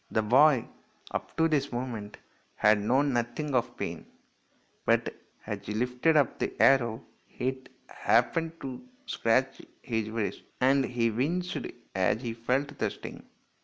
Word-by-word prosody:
The 110 - +1
boy, 130 +3 +5 0.5
up - - -5
to 165 - +4
this 145 -3 0
moment, 120 -4 -5 0.4
had 105 0 +4
known 135 +6 +2
nothing 120 +5 -2
of 125 -2 0
pain, - - -5 0.8
but - - +2 0.3
as 105 -2 -3
he 105 - -3
lifted 125 +7 +2
up 145 - +2
the - - -3
arrow 120 -4 +4 0.3
it 130 +1 -3 0.2
happened 165 0 +1
to 130 -2 -6 0.2
scratch 130 - +1 0.2
his 110 -3 -2
wrist, 110 -2 -3 0.2
and 135 +1 +4
he 120 -2 0
winced 170 +10 -1 0.4
as 95 +3 +2
he 115 -2 -2
felt 130 +5 -1
the 105 - +1
sting. - - -10
125 Hz, 140 wpm, -29 LUFS, 115-140 Hz, 0.8 s, boy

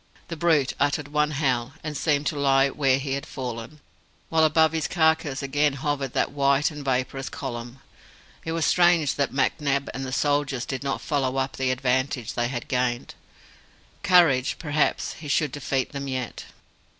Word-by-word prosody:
The 165 - -4
brute 155 -5 +2
uttered 145 0 0
one 150 0 +1
howl, 135 -4 -1
and 155 -1 -4
seemed 145 0 +1
to 150 - -1
lie 135 -1 +3
where 135 -2 +2
he 135 0 -3
had 140 0 -4
fallen; 125 +3 -6 0.5
while 160 -1 +3
above 160 +1 +4
his 160 -2 -1
carcase 160 -5 +1
again 145 +1 +1
hovered 140 -1 -2
that - - 0
white 140 +2 +2
and 150 -1 -8
vaporous 135 0 -1
column. 120 -2 -6 0.6
It 160 - -3
was 165 -1 0
strange 175 -5 +4
that 140 -1 -1
McNab 140 +1 0
and 135 - -5
the 130 - -5
soldier 145 -1 0
did 130 +1 -4
not 140 -1 -2
follow 135 -3 -1
up 135 0 -1
the 130 -1 0
advantage 130 -1 0
they 120 -1 0
had 120 -1 -5
gained. 125 -1 -1 0.9
Courage 170 -10 +4
perhaps 150 -2 0
he 155 - -8
should 145 0 +1
defeat 135 -1 -2
them 140 -1 -5
yet! 130 -2 -4
140 Hz, 170 wpm, -25 LUFS, 130-150 Hz, 0.9 s, above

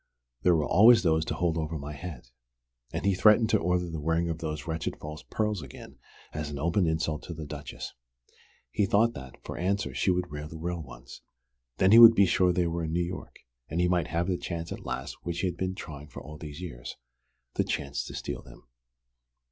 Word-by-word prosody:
There 90 -1 +4
were 75 -2 +1
always 115 +2 +7
those 80 -2 +3
to - - -2
hold 85 -2 0
over 80 0 -3
my 75 +1 -6
head. 75 -5 -8 0.6
And - - -3
he 100 - +4
threatened 105 +4 +5
to - - +4
order 90 +1 +1
the 80 -2 -5
wearing 80 +3 0
of 80 -1 -3
those 75 -2 -4
wretched 80 -1 -3
false 75 +1 -7
pearls 105 -4 -1
again 70 -4 -11 0.3
as 75 -1 -3
an 75 - -5
open 85 +5 +1
insult 80 -1 -1
to 85 - -6
the 80 -1 -6
Duchess. 75 -1 -7 0.8
He 100 - +1
thought 115 +4 +3
that, 65 -2 -9
for - - -6
answer, 100 +3 0
she - - +1
would 90 -2 0
wear 75 0 -5
the 80 - -9
real 85 +1 -3
ones! - - -11 0.6
Then 95 +1 +4
he 115 - +10
would 115 -1 +11
be 100 - +6
sure 90 0 +3
they 90 0 +1
were 85 0 -1
in 80 - -3
New 85 +1 +1
York, 90 +2 -8 0.3
and 80 - -2
he 90 - +3
might 90 -3 +1
have 85 +1 0
the 90 -1 -1
chance 85 -1 -5
at - - -7
last 65 +3 -5
which 85 -1 -3
he'd 90 -3 -1
been 95 +1 -2
trying 75 -6 -8
for 70 - -10
all 75 +3 -10
these 75 +1 -8
years: - - -7 0.6
the - - +1
chance 70 -4 -2
to - - -8
steal - - -4
them." - - -16
85 Hz, 220 wpm, -28 LUFS, 75-90 Hz, 0.8 s, would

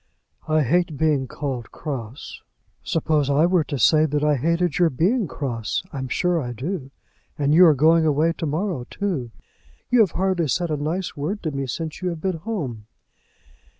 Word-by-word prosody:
"I 155 -1 +3
hate 170 +3 +1
being 145 -3 +1
called 130 -5 -5
cross." 130 -4 -7 0.4
"Suppose 155 -3 0
I 145 +3 +4
were 175 -2 +3
to 140 - -3
say 155 +6 +4
that 150 0 -1
I 150 -1 +3
hated 170 +5 0
your 175 -2 +5
being 190 - +1
cross. 120 -6 -3
I'm 130 -2 -4
sure 175 +6 +1
I 120 -2 -4
do; 140 - -4 0.5
and 145 0 +1
you 175 +2 +8
are 155 - +5
going 160 +4 +4
away 155 +3 +2
to 165 - -1
morrow, 155 -4 -2
too. 175 -12 -3 0.6
You 245 - +5
have 210 -6 +4
hardly 185 -3 0
said 170 +4 -1
a - - +1
nice 165 +5 -3
word 170 +9 -3
to 160 - -1
me 135 -1 -3
since 160 +7 -5
you 180 - -1
have 170 -2 -5
been 185 0 -2
home." 150 - -5
155 Hz, 185 wpm, -23 LUFS, 140-175 Hz, 0.6 s, you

